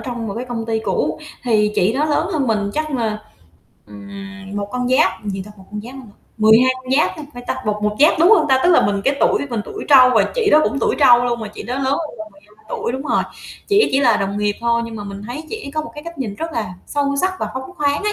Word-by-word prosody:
trong 240 -3 -5
một 200 - -4
cái 240 +3 -4
công 235 -2 -5
ty 225 -1 0
cũ, - - -1 0.3
thì 210 -3 +2
chị 190 +5 +2
đó 280 +5 0
lớn 310 +3 0
hơn 295 -5 0
mình 210 -3 0
chắc 310 0 -2
là, 225 -6 -1 0.7
ừm, 195 - -10
một 200 0 -3
con 250 0 -1
giáp 255 -3 +2
gì 195 -2 -3
ta? - - -11
Một 190 - -15
con 210 0 -5
giáp 240 +5 -10
hả 270 - -8
ta? - - -23 0.2
12 220 +4 +5
con 255 - -9
giáp 305 - +3
ha 310 - -7
phải 245 - -8
ta? - - -2
Một 210 0 -1
một 210 0 0
giáp, 305 +2 +5
đúng 345 +4 +6
hông 390 -9 +5
ta? 265 -1 +4
Tức 355 - +5
là 340 - +5
mình 200 -1 -1
cái 275 - +2
tuổi - - +2
mình 235 -3 -1
tuổi 415 - -7
trâu 260 -3 +8
và 210 -3 +5
chị 470 -4 +1
đó 305 - +6
cũng 280 - -1
tuổi - - +1
trâu 245 -4 +6
luôn, 240 -1 -1
mà 220 - -5
chị 210 - -9
đó 245 - -4
lớn 270 +1 -2
hơn 285 +3 -2
mình 215 0 -7
12 210 +2 -23
tuổi - - -3
đúng 260 +1 -4
rồi. 305 - +1 0.5
Chỉ 415 +1 +4
chỉ 270 - +3
là 235 -5 +4
đồng 200 +1 -2
nghiệp 205 0 0
thôi, 235 0 +1
nhưng 230 -1 -7
mà 205 - -6
mình 200 0 -7
thấy 265 +7 -6
chị 440 - -6
ấy - - -6
có 310 +1 -1
một, - - -9
cái, 295 +1 -9
cách 335 -2 -9
nhìn 225 -7 -3
rất 325 +9 -5
là 210 -8 -3
sâu 280 -1 -1
sắc 370 0 +1
và - - -2
phóng 260 +4 -6
khoáng 290 0 0
ấy 420 - +1
240 Hz, 290 wpm, -19 LUFS, 210-285 Hz, 0.7 s, trâu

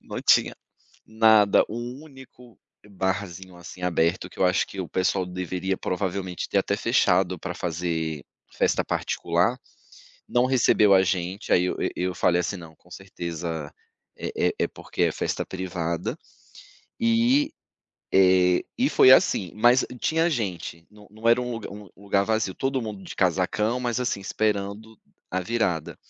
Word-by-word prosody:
Não - - -7
tinha - - +4 0.5
nada, 110 -2 +5
um 120 +5 -6
único 130 -4 -16 0.3
barzinho, 95 -2 -4
assim, 90 +1 -11
aberto 90 0 0
que - - -17
eu - - +3
acho 90 - +2
que 100 - -11
o 90 - -5
pessoal 95 0 0
deveria 90 +1 -3
provavelmente 95 -1 -3
ter 100 - +1
até 100 +1 0
fechado 95 -6 +2
pra 90 +1 -5
fazer 80 -3 -3 0.3
festa - - +1
particular 90 +9 0 0.7
não 120 0 +2
recebeu 115 -5 +4
a 95 - +6
gente, 95 +2 -2
aí 90 - +4
eu - - -2
e - - -1
eu 90 0 -2
falei 90 -1 +2
assim: 95 - -3
"Não, 80 -3 -12
com 90 - -25
certeza 85 -5 -6 0.4
é - - -5 0.2
é - - -1
é - - +3
porque - - -5
é - - +1
festa - - -3
privada 90 -3 -4 0.8
e, 235 +6 +3 0.6
eh, 90 -1 +4
e 260 +3 +2
foi 130 - +6
assim, 95 -8 +4
mas, 120 +4 +4
hum, 125 - -8
tinha 165 +2 +1
gente, 90 - -4
não 105 0 -17
não 110 +2 -4
era 120 +1 +4
um 125 - -4
lug 115 -2 -5
um 105 -2 -11
lugar 100 0 +2
vazio, 110 -3 0
todo 135 -1 -1
mundo 105 -4 -7
de - - -9
casacão, 100 +6 +1
mas 120 0 -1
assim, 120 -5 -1
esperando 105 +1 -2 0.3
a 95 - 0
virada. 90 -7 -1
95 Hz, 160 wpm, -25 LUFS, 90-115 Hz, 0.8 s, a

